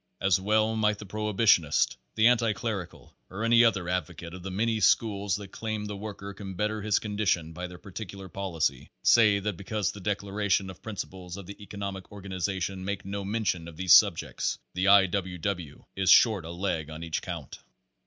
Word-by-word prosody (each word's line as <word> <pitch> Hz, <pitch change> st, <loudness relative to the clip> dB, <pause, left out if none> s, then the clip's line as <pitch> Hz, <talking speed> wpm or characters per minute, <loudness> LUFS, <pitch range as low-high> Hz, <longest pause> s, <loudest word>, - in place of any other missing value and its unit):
As 95 Hz, -1 st, +2 dB
well 110 Hz, +2 st, +2 dB
might 105 Hz, -1 st, +2 dB
the 105 Hz, -, -9 dB
prohibitionist, 105 Hz, -6 st, +2 dB, 0.2 s
the 110 Hz, -, +3 dB
anti 115 Hz, -2 st, +4 dB
clerical, 100 Hz, -5 st, -5 dB
or 100 Hz, +4 st, -5 dB
any 115 Hz, +1 st, +6 dB
other 100 Hz, -6 st, +2 dB
advocate 85 Hz, -1 st, -3 dB
of 90 Hz, -, -8 dB
the 95 Hz, -, -5 dB
many 110 Hz, +4 st, 0 dB
schools 100 Hz, -2 st, +2 dB
that 100 Hz, -1 st, -7 dB
claim 110 Hz, -2 st, -4 dB
the 105 Hz, -1 st, -5 dB
worker 100 Hz, -1 st, -7 dB
can 95 Hz, -1 st, -8 dB
better 105 Hz, +2 st, -1 dB
his 105 Hz, -1 st, +2 dB
condition 100 Hz, -6 st, -1 dB
by 90 Hz, +2 st, -5 dB
their 90 Hz, 0 st, -11 dB
particular 95 Hz, 0 st, -8 dB
policy, 80 Hz, -8 st, -2 dB
say 110 Hz, -4 st, +6 dB
that 100 Hz, -2 st, -3 dB
because 100 Hz, 0 st, -2 dB
the 100 Hz, -, -11 dB
declaration 100 Hz, 0 st, 0 dB
of 95 Hz, +1 st, -15 dB
principles 95 Hz, -3 st, -6 dB
of 100 Hz, -, -8 dB
the 100 Hz, +3 st, -10 dB
economic 100 Hz, -2 st, -6 dB
organization 95 Hz, -1 st, -3 dB
makes 100 Hz, 0 st, -4 dB
no 100 Hz, +1 st, -4 dB
mention 95 Hz, -5 st, -1 dB
of 80 Hz, -2 st, -11 dB
these 90 Hz, -4 st, +5 dB
subjects, -, -, +4 dB, 0.2 s
the 95 Hz, +2 st, 0 dB
I. 100 Hz, -1 st, +8 dB
W. 95 Hz, -1 st, -3 dB
W. 85 Hz, -5 st, -4 dB
is 95 Hz, -2 st, +1 dB
short 105 Hz, -4 st, +6 dB
a -, -, -7 dB
leg 85 Hz, -4 st, -2 dB
on 80 Hz, +1 st, -7 dB
each 80 Hz, -1 st, -2 dB
count. -, -, -7 dB
100 Hz, 185 wpm, -28 LUFS, 90-105 Hz, 0.2 s, I